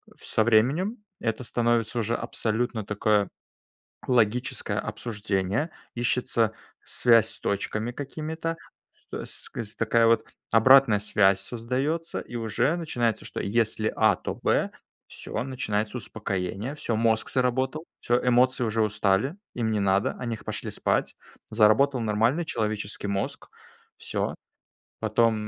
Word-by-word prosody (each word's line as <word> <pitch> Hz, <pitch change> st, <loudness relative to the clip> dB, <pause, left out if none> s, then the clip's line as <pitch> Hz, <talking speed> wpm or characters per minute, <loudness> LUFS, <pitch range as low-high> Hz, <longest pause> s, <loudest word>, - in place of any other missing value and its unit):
в -, -, -15 dB
со 110 Hz, -, +2 dB
временем, 135 Hz, -, +2 dB, 0.2 s
это 115 Hz, +2 st, -2 dB
становится 120 Hz, -1 st, 0 dB
уже 115 Hz, +1 st, 0 dB
абсолютно 115 Hz, 0 st, -2 dB
такое 105 Hz, 0 st, +1 dB, 0.8 s
логическое 125 Hz, 0 st, +1 dB
обсуждение, 105 Hz, -, -2 dB, 0.2 s
ищется 120 Hz, -2 st, +1 dB, 0.3 s
связь 115 Hz, -2 st, +4 dB
с -, -, -8 dB
точками 110 Hz, +3 st, -2 dB
какими-то, 160 Hz, +4 st, -4 dB, 0.6 s
с -, -, -6 dB
кс 115 Hz, -1 st, -6 dB
такая 115 Hz, 0 st, +3 dB
вот 115 Hz, 0 st, +3 dB, 0.2 s
обратная 115 Hz, -1 st, +7 dB
связь 100 Hz, -2 st, +3 dB
создается, 130 Hz, +10 st, -2 dB
и 120 Hz, -, -8 dB
уже 115 Hz, +8 st, +1 dB
начинается, 120 Hz, -10 st, -1 dB
что -, -, -5 dB
если 110 Hz, 0 st, +1 dB
А- -, -, +5 dB
то -, -, -5 dB
Б. -, -, +1 dB, 0.4 s
Всё, 110 Hz, -, -5 dB
начинается 110 Hz, -4 st, -2 dB
успокоение, 105 Hz, +3 st, -4 dB
всё, 120 Hz, -6 st, -3 dB
мозг 110 Hz, 0 st, +1 dB
заработал, 130 Hz, +5 st, 0 dB
всё, 120 Hz, +1 st, +2 dB
эмоции 125 Hz, +1 st, +3 dB
уже 110 Hz, 0 st, +1 dB
устали, 105 Hz, -, +1 dB, 0.2 s
им 115 Hz, -2 st, -1 dB
не 105 Hz, -, +1 dB
надо, 100 Hz, 0 st, +2 dB
они 120 Hz, -3 st, -2 dB
х -, -, -15 dB
пошли -, -, -4 dB
спать. -, -, 0 dB, 0.3 s
Заработал 110 Hz, +5 st, +4 dB
нормальный 115 Hz, +9 st, +1 dB
человеческий 105 Hz, -7 st, -3 dB
мозг, 100 Hz, 0 st, -3 dB, 0.5 s
всё. -, -, -3 dB, 0.7 s
Потом, 115 Hz, -1 st, +3 dB
115 Hz, 125 wpm, -26 LUFS, 105-125 Hz, 0.8 s, обратная